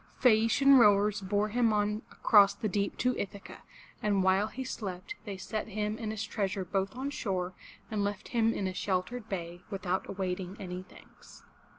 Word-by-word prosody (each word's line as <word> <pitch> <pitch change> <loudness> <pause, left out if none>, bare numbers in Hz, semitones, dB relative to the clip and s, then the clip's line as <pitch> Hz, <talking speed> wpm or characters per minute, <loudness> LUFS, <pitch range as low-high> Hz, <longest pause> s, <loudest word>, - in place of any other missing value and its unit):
Phae 225 -4 +5
a'ci 230 +4 +1
an 275 -1 +9
rowers 205 -2 +4
bore 205 +2 0
him 235 0 +2
on 210 0 0
across 200 -2 +5
the 215 - -2
deep 200 0 -1
to 250 0 +1
Ithaca, 200 0 -6 0.4
and 200 -2 +2
while 190 +2 +3
he 260 +4 -6
slept 200 - -5
they 200 -3 -5
set 215 +3 -4
him 210 0 -2
and 220 - -3
his 215 -1 -3
treasure 200 -3 -2
both 195 +2 -1
on 270 +3 -3
shore 185 -8 -2 0.4
and 210 -2 0
left 205 -1 -3
him 225 -2 +2
in 200 - -2
a 185 - -2
sheltered 200 +5 -2
bay, 175 -2 -5
without 190 -2 -2
awaiting 185 0 -3
any 180 -1 -5
thanks. - - -17
205 Hz, 185 wpm, -30 LUFS, 190-220 Hz, 0.4 s, an